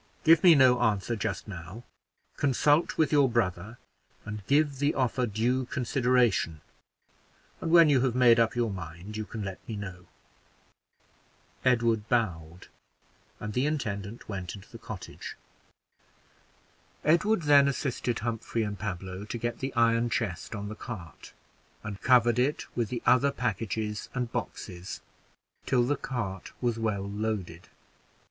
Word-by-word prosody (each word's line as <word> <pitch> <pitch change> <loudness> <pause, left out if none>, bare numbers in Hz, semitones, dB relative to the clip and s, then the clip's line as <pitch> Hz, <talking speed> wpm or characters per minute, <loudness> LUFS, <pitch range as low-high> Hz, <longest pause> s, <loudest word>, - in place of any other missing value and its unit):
Give 165 0 +6
me 175 -3 +8
no 130 -3 +5
answer 105 +1 +1
just 105 - -3
now; 95 +4 -8 0.5
consult 145 +3 +2
with 160 - +2
your 145 -3 +4
brother, 110 -1 -1 0.5
and 105 -1 -6
give 145 -1 +2
the 145 +1 +1
offer 125 -1 +1
due 120 +5 0
consideration, 125 - +1 1.0
and 165 - -2
when 165 -1 +7
you 140 -4 +4
have 125 -2 +1
made 120 -2 +6
up 115 +2 +2
your 120 -3 0
mind 90 +2 -8
you 110 0 -3
can 110 0 -6
let 95 -1 -5
me 110 - -3
know." 95 -3 -8 1.6
Edward 115 -3 +2
bowed, 90 -8 -1 0.7
and 105 0 -5
the 125 +5 +1
intendant 105 -7 -4
went 95 -3 -5
into 100 +1 -13
the 115 - -10
cottage. 110 -4 -8 1.7
Edward 175 +5 +3
then 145 -2 +6
assisted 125 -3 -1
Humphrey 115 0 -2
and 105 -1 -4
Pablo 95 -1 -5
to 110 - -5
get 120 +1 -3
the 135 +1 -3
iron 115 0 +3
chest 110 -2 -3
on 105 0 -5
the 105 - -5
cart, 100 -5 -9 0.5
and 105 -2 -6
covered 120 -2 +4
it 145 +5 0
with 115 -4 -1
the 120 - -4
other 130 +3 +5
packages 110 -2 -3
and 125 -2 -2
boxes, 90 +1 -5 0.7
till 125 -2 +3
the 140 +4 +1
cart 105 -9 -5
was 120 -2 -1
well 105 -3 -1
loaded. 100 -5 -4
115 Hz, 140 wpm, -28 LUFS, 100-130 Hz, 1.7 s, me